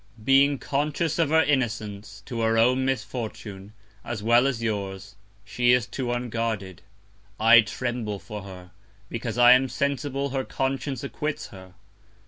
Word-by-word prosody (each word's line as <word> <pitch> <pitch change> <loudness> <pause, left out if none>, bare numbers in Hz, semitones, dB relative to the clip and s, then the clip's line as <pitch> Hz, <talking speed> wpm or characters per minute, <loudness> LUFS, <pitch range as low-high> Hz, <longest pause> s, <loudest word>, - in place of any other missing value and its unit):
Being 135 +3 +4
conscious 150 +5 -1
of 160 -3 +2
her 160 +1 +4
Innocence, 110 -7 -2
to 120 -3 -4
her 115 0 +2
own 125 +3 +3
Misfortune, 110 -5 -5 0.3
as 115 -3 -5
well 120 +3 +4
as 120 -4 -2
yours, 100 -2 -4 0.3
she 120 +4 +2
is 125 -2 +2
too 125 -1 -4
unguarded. 115 -6 -3 0.6
I 115 +1 +8
tremble 115 -1 -4
for 105 +3 -8
her; 90 -2 -11 0.4
because 115 0 -4
I 120 0 +8
am 130 +1 +5
sensible 140 0 -2
her 135 -1 -1
Conscience 135 +1 -3
acquits 150 +2 -4
her. 95 -2 -13
120 Hz, 140 wpm, -25 LUFS, 105-135 Hz, 0.6 s, I